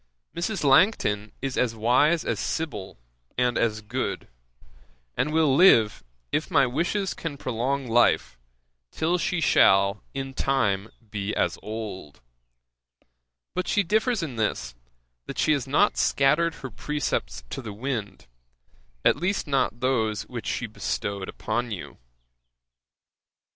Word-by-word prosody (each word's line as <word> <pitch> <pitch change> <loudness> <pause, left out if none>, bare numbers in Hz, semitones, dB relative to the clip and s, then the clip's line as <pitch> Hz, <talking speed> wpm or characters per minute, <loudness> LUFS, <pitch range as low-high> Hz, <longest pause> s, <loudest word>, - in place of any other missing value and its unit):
Mrs. 175 +2 -2
Langton 135 - +3
is 135 -2 -1
as 120 -2 +1
wise 130 +9 +3
as - - -1
Sibyl, 145 -13 -4 0.4
and 125 -1 +2
as 110 -2 0
good; 105 - -3 0.9
and 150 - 0
will 155 -4 +3
live, 115 - +5 0.3
if 155 +5 -1
my 140 -7 +4
wishes 175 +9 -1
can 155 -4 -5
prolong 130 +2 -2
life, 115 - +3 0.5
till 170 - 0
she 175 +1 0
shall 100 -8 +4
in 135 0 -4
time 110 -8 0 0.2
be 105 -1 -3
as - - 0
old. 105 -8 -7 1.3
But 185 - -2
she 205 - +2
differs 215 +2 +1
in 135 -7 -5
this, 85 - -1 0.5
that - - -6
she - - +2
has 140 -4 0
not 150 +10 +3
scattered 150 +5 +2
her 130 - -8
precepts 110 - -3
in - - -5
the 110 - -6
wind, 110 -3 -4 0.8
at - - +5
least 190 +3 -1
not 135 -4 0
those 110 -5 +1
which - - -7
she - - -1
bestowed 95 +11 -3
upon 120 +2 -2
you. 100 -6 -7
130 Hz, 130 wpm, -26 LUFS, 110-155 Hz, 1.3 s, live